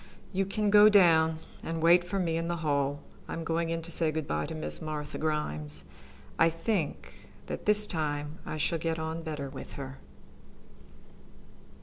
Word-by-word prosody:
You 190 0 0
can 210 +1 0
go 210 0 +8
on 215 - +7
down 160 -4 +5 0.2
and 165 0 -4
wait 170 +2 +5
for 180 +3 -3
me 170 -4 0
in 165 0 -1
the 175 - -1
hall. 145 -1 0 0.3
I - - -5
am 165 - -4
going 165 +1 -1
in 165 0 -2
to 170 - -1
say 165 -1 +6
good 155 -1 -3
by 75 0 -1
to - - -6
Miss 155 - -3
Martha 150 -1 -5
Grimes. 75 - -3 0.6
I 165 - +6
think 165 - -3 0.2
that - - -6
this 210 0 +5
time 150 -2 -3
I 155 - -5
shall 165 +2 0
get 165 0 -1
on 160 +1 -4
better 150 -4 -5
with 135 0 -9
her." 135 -1 -8
160 Hz, 185 wpm, -29 LUFS, 150-170 Hz, 0.6 s, go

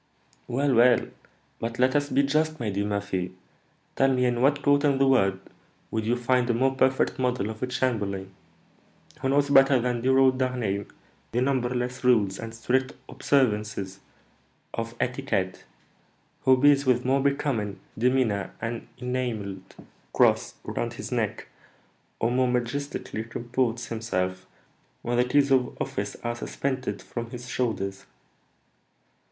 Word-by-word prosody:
"Well, 135 +2 +1
well; 120 0 +4 0.5
but 115 0 -4
let 130 +2 +3
us 145 0 +1
be 140 - +3
just, 155 +2 +1
my 110 -3 -2
dear 100 +1 -1
Murphy: 100 -3 -2 0.6
tell 135 0 +3
me, 125 -1 +2
in 120 -1 +1
what 140 +2 +3
court 145 0 +4
in 140 -2 +3
the 135 - +4
world 95 -8 +3 0.5
would 110 -1 -2
you 120 - +2
find 125 0 +1
a 120 - +2
more 130 +2 +2
perfect 130 0 +1
model 125 -4 0
of 110 - -10
a 125 - 0
chamberlain? 105 -7 -2 0.9
Who 135 - 0
knows 140 +1 +2
better 135 -1 +6
than 120 0 -1
dear 130 +2 +3
old 130 -1 +4
D'Harneim 120 -6 -1 0.5
the 120 - +1
numberless 125 -1 -1
rules 105 -6 +3
and 115 0 -6
strict 130 +3 0 0.2
observances 105 -7 0 0.7
of 115 0 -4
etiquette? 125 -8 -2 0.8
Who 130 -1 +6
bears 145 0 +5
with 125 -1 +3
more 135 +1 +2
becoming 135 -7 -1 0.2
demeanour 120 -4 +1
an 115 0 -4
enamelled 120 -7 -4 0.4
cross - - +3
around - - -3
his - - -7
neck, - - -2 0.7
or 115 - +1
more 130 +1 +2
majestically 125 -1 -2
comports 120 +1 -2
himself 95 -6 -3 0.6
when 120 0 -1
the 125 - +4
keys 140 +2 +2
of 130 -2 +2
office - - -3
are 120 0 -2
suspended 130 -4 -3
from 120 -1 -6
his 125 0 -8
shoulders?" 100 -7 -2
125 Hz, 145 wpm, -26 LUFS, 110-130 Hz, 0.9 s, better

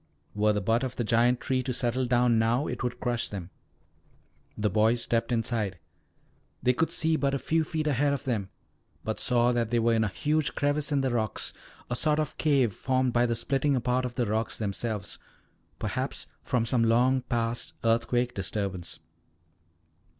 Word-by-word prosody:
Were 105 +1 +2
the 105 -1 0
butt 115 +6 +1
of 130 - -3
that 120 - -1
giant 120 +2 +3
tree 130 -2 0
to 130 - -3
settle 125 +1 0
down 120 -1 +3
now, 120 +5 +2
it - - -4
would 125 -1 -3
crush 120 -2 -1
them. 95 -3 -7 1.1
The 105 0 +1
boys 110 +4 +2
stepped 115 +1 0
inside. 115 -5 -1 0.9
They 125 - +4
could 160 +6 +1
see 160 0 +2
but 140 -1 +1
a - - +1
few 160 +4 +1
feet 155 0 -3
ahead 145 0 +2
of 140 -2 -2
them, 110 -7 -2 0.5
but 110 - -3
saw 120 0 +3
that 120 -2 0
they 120 - +1
were 115 0 +3
in 110 -1 +2
a - - +1
huge 150 +8 -1
crevice 145 +1 0
in 140 -1 +2
the 130 -1 0
rocks, 110 -3 -2 0.3
a 125 - -2
sort 150 +4 +2
of 155 -2 -3
cave 135 -8 +3
formed 130 +1 0
by 120 0 +3
the 115 - 0
splitting 135 +4 +1
apart 125 +1 +1
of 125 -1 -4
the 125 - +1
rocks 110 +1 -1
themselves, 105 0 -3 0.6
perhaps - - -3 0.2
from 120 -3 0
some 115 0 +1
long 125 +3 +3
past 120 -2 -2
earthquake 120 +2 +1
disturbance. 95 -3 -4
120 Hz, 180 wpm, -28 LUFS, 115-130 Hz, 1.1 s, They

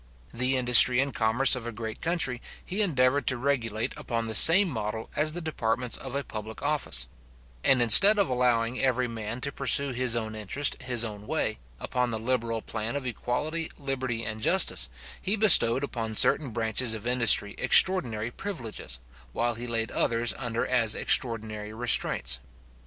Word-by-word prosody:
The 125 +2 -1
industry 125 0 +7
and 135 -1 -2
commerce 120 +5 +1
of 120 -2 -8
a - - -6
great 110 0 -9
country, 160 -8 -2 0.2
he 195 +4 -3
endeavoured 140 - 0
to 130 - +2
regulate 120 -5 -3
upon 115 -1 -5
the 110 - -6
same 180 - +8
model 110 -5 -7
as 155 0 0
the 175 - -6
departments 125 -6 -3
of 130 -1 -8
a 140 - -3
public 110 -2 -10
office; 145 - 0 0.6
and 130 -2 +2
instead 195 - +8
of 200 - 0
allowing 125 -1 -2
every 130 -1 -1
man 115 +1 -8
to 140 - -2
pursue 140 0 +2
his 125 -2 -1
own 110 -2 -5
interest 110 +8 -1
his 125 -2 -2
own 105 -2 -7
way, - - -4 0.2
upon 125 -1 -4
the 110 - -5
liberal 115 -1 -4
plan 110 +3 -6
of 140 -2 -6
equality, 150 +7 -5
liberty, 130 -4 -5
and 110 0 -7
justice, - - +3 0.3
he 195 - -2
bestowed 145 - +4
upon 115 -5 -6
certain 140 +5 +4
branches 115 +1 -2
of 110 0 -10
industry 115 -4 +3
extraordinary 120 - +3
privileges, 120 - -8 0.4
while 120 0 -2
he 120 +2 -7
laid 115 -1 -4
others 115 0 0
under 120 -2 -4
as 115 -4 0
extraordinary 110 -3 -1
restraints. 110 - 0
120 Hz, 165 wpm, -25 LUFS, 110-135 Hz, 0.6 s, same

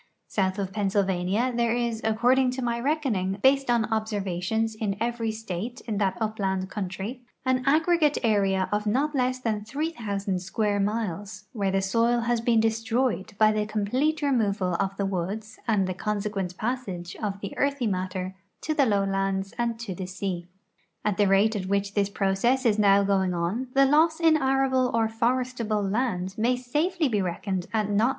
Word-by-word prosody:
South 190 -1 0
of 195 -1 -3
Pennsylvania 200 +3 0
there 235 -1 +2
is, 235 -2 -1
according 245 +4 +3
to 260 0 -4
my 235 -1 -1
reckoning, 245 -9 0
based 270 0 +4
on 235 -2 +3
observations 215 0 -1
in 210 -2 -2
every 230 -1 -1
state 220 +2 -5
in 215 -4 -3
that 195 -2 +1
upland 195 -4 -2
country, 200 +5 -4 0.2
an 260 0 +1
aggregate 310 0 +3
area 195 -4 +2
of 210 +1 -1
not 275 +8 +1
less 255 -2 +1
than 220 -4 -2
three 290 +9 -2
thousand 200 - -2
s(]uare 205 +2 0
miles 210 -1 -3
where 200 -5 0
the 195 0 +1
soil 230 +4 +2
has 235 0 0
been 230 -1 +3
destr()}'ed 225 -1 0
by 215 -1 +5
the 210 -1 -1
complete 255 +9 0
removal 210 -9 +1
of 195 0 -1
the 200 - 0
woods 200 +4 -4
and 210 -4 +2
the 185 - -2
consequent 200 -2 -3
])assage 205 -7 -4
of 200 -2 -3
the 200 - -6
earthy 280 -3 0
matter 185 -2 -2 0.3
to 310 - -1
tlie 280 -5 +3
lowlands 195 -1 0
and 235 -1 0
to 230 -5 -5
the 180 +1 -6
sea. 185 -2 -4 0.6
At 210 -2 +1
the 205 -1 +4
rate 200 +3 +3
at 190 -2 -3
which 200 0 0
this 200 -1 +1
process 205 +7 +1
is 215 -2 +3
now 200 -1 +5
going 190 -2 +1
on, 185 +10 -1
the 275 0 +6
loss 315 +4 +3
in 325 -2 +5
arable 265 -2 +2
or 225 -1 +3
forestal)le 230 -3 -1
land 195 -5 -1
may 240 +3 +3
safely 300 +7 0
he 210 -5 0
reckoned 185 0 -3
at 210 -2 0
not 210 +2 +3
le. - - +2
215 Hz, 175 wpm, -26 LUFS, 195-245 Hz, 0.6 s, the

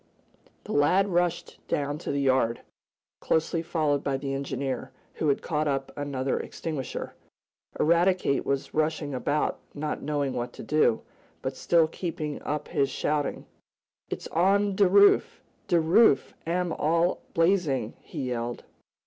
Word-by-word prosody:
The - - -8
lad 185 +8 +3
rushed 175 -1 -1
down 145 +1 -1
to - - -4
the 140 0 0
yard, 130 -3 +2 0.6
closely 160 +1 0
followed 155 -4 0
by 135 -1 0
the 135 0 -4
engineer, 135 -1 -3 0.2
who 155 - -2
had 140 - +1
caught 155 -1 -1
up 135 -1 -1
another 135 -2 -2
extinguisher. 150 -5 -5 0.7
Eradicate 170 -2 +3
was 140 -1 -2
rushing 155 -2 0
about, 145 +4 -1 0.2
not 150 +1 -3
knowing 145 -2 -1
what 120 0 -4
to - - -9
do, 150 -7 +2 0.4
but - - -3
still 165 -2 +3
keeping 155 -3 -4
up 150 0 -3
his 140 -5 +1
shouting. 150 -1 -1 0.6
"It's - - -5
on 195 +4 +2
de 200 0 +5
roof! 200 +2 +5 0.3
De 170 - +3
roof 165 0 +4
am 175 0 0
all 165 +3 +1
blazin'!" 165 - +2
he - - -6
yelled. 120 0 -3
150 Hz, 140 wpm, -27 LUFS, 140-170 Hz, 0.7 s, de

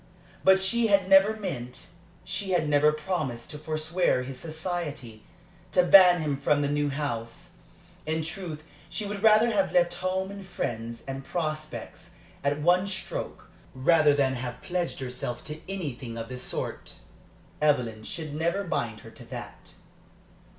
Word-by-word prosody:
But 190 0 +6
she 225 +5 +2
had 200 -3 +3
never 195 +3 +6
meant, 135 - -5 0.3
she 195 -2 -2
had 165 -4 +2
never 150 +1 +4
promised 150 -7 -3
to 150 - -7
forswear 155 -1 0
his 130 0 -7
society, 155 -8 -5 0.5
to 180 - +5
ban 180 -1 +8
him 145 -3 -1
from 145 +1 +2
the 140 - 0
new 145 0 +1
house. 120 -5 -4 0.6
In 160 0 0
truth 160 -2 -5 0.3
she 210 - -2
would 200 0 -4
rather 220 +2 +6
have 200 -3 +1
left 175 -1 +3
home 185 +2 -2
and 200 0 -8
friends 115 -10 -4
and 135 0 -5
prospects, 155 -1 -4 0.3
at 145 +1 +1
one 180 +3 +4
stroke, 190 -1 -5 0.2
rather 150 +2 +4
than 135 -2 +2
have 125 -1 -5
pledged 175 -5 -2
herself 125 -1 -4
to 150 0 -7
anything 135 -11 -5
of 115 0 -5
the 125 0 -6
sort. - - -4 0.7
Evelyn 125 -7 +2
should 155 +6 -6
never 170 +6 0
bind 120 - -2
her 115 - -12
to 120 - -13
that. 120 0 -9
155 Hz, 150 wpm, -27 LUFS, 130-185 Hz, 0.7 s, ban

